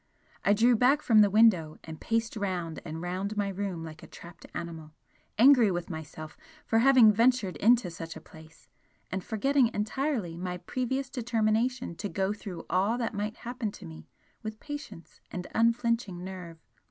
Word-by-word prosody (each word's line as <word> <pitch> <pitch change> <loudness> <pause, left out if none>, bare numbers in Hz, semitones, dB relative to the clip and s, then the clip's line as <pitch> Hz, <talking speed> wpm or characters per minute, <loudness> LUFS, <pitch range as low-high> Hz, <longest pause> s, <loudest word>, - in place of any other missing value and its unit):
I 200 - +4
drew 235 +3 +4
back 265 +6 +3
from 220 -3 +6
the 205 - +5
window 195 -7 +4
and 160 -1 -9
paced 230 0 -1
round 180 -6 -3
and 160 0 -6
round 190 +4 -3
my 205 -1 0
room 190 -3 -4
like 155 -1 -9
a - - -12
trapped 170 0 -13
animal 160 -2 -7 0.4
angry 245 -2 +7
with 175 -1 -3
myself 155 -1 -8 0.3
for 225 - +2
having 245 -4 +7
ventured 230 -5 +2
into 225 0 +3
such 165 0 -7
a - - -8
place, 160 +1 -17 0.4
and 190 -1 -3
forgetting 260 +3 +2
entirely 215 - -2
my 180 0 -4
previous 260 +7 -3
determination 235 -2 0
to 205 - -4
go 195 +1 -1
through 190 -6 -8
all 200 +6 +1
that 235 -2 -2
might 210 +2 -3
happen 240 -3 -4
to - - -11
me 80 -1 -11 0.3
with 215 -1 -6
patience 290 - -9
and 180 -1 -6
unflinching 230 -5 +1
nerve. 180 -3 -8
205 Hz, 165 wpm, -29 LUFS, 175-235 Hz, 0.4 s, angry